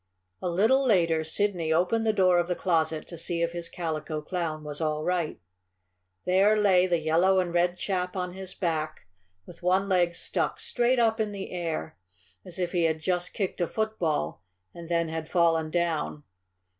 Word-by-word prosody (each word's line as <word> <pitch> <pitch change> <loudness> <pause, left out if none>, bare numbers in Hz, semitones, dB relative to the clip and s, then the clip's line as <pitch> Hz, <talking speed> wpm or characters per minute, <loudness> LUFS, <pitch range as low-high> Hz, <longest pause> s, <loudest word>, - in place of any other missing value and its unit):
A 180 - -1
little 220 +10 +3
later 170 -9 +3
Sidney 170 -1 0
opened 185 +8 +2
the - - +5
door 185 -4 +4
of 175 - 0
the 180 - -1
closet 160 -4 0
to 170 - -8
see 170 0 -1
if 170 - 0
his 170 -1 -5
Calico 160 -2 -3
Clown 155 -1 -3
was 150 +1 -5
all 155 -1 -1
right. 175 - -1 0.9
There 195 +4 +4
lay 190 -3 +4
the 175 -1 +2
yellow 170 +4 +3
and 175 -2 -1
red 175 +1 +2
chap 180 -1 -2
on 180 -1 -3
his 190 0 -5
back, 155 -4 -2 0.4
with 170 - -13
one 185 +2 +2
leg 175 -3 +2
stuck - - -1
straight 245 +1 +1
up 225 -2 +2
in 215 -1 0
the 195 -1 -6
air, 165 -3 -4 0.4
as 175 -2 -10
if 180 -2 -1
he 175 -2 +1
had 160 -1 +1
just 180 +1 -1
kicked 190 -3 -2
a 175 - +2
football 165 - -2 0.3
and 170 -1 -10
then 170 -1 +1
had 160 0 -5
fallen 165 -3 +2
down. 165 -3 -1
175 Hz, 180 wpm, -27 LUFS, 160-185 Hz, 0.9 s, the